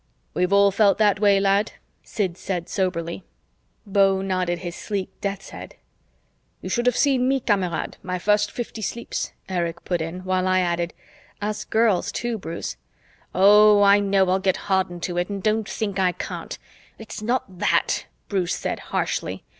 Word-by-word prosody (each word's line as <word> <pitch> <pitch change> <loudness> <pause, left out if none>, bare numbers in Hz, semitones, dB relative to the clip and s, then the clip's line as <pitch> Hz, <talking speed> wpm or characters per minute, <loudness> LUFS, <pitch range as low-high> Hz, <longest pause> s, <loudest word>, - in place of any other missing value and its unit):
"We've 180 +1 0
all 200 0 +5
felt 200 0 +4
that 205 -2 +3
way, 200 -2 +4
lad," 200 +1 +2 0.3
Sid 190 -6 -2
said 180 -2 -4
soberly; 180 -2 -2 0.6
Beau 195 -1 +3
nodded 185 -2 -1
his 175 0 -6
sleek 200 -3 -4
death's 195 -1 -4
head; - - -9 0.8
"You - - -7
should 240 0 0
have 250 - +3
seen 265 -3 +3
me, 270 0 +2
Kamerad, 195 -8 -1
my 185 0 -3
first 210 +2 +2
fifty 230 -2 -6
sleeps," 235 +3 -3 0.2
Erich 170 -2 -3
put 175 -2 -1
in; 165 +3 -5
while 185 0 0
I 185 0 +3
added, 170 -1 -1 0.4
"Us 210 +1 -3
girls, 220 -4 +2
too, 235 -2 -3
Bruce." 165 - -5 0.6
"Oh, 205 +2 +7
I 200 0 +6
know 195 -1 +2
I'll 190 - +2
get 190 -1 +1
hardened 180 -2 0
to 175 -2 -1
it, 180 - -1
and 200 -2 -5
don't 215 0 +1
think 200 -3 -3
I 180 -1 +2
can't. - - -6 0.4
It's 220 -1 -8
not 215 -5 -2
that," - - +1 0.2
Bruce 185 -4 0
said - - -3
harshly. - - -3
195 Hz, 165 wpm, -23 LUFS, 180-210 Hz, 0.8 s, Oh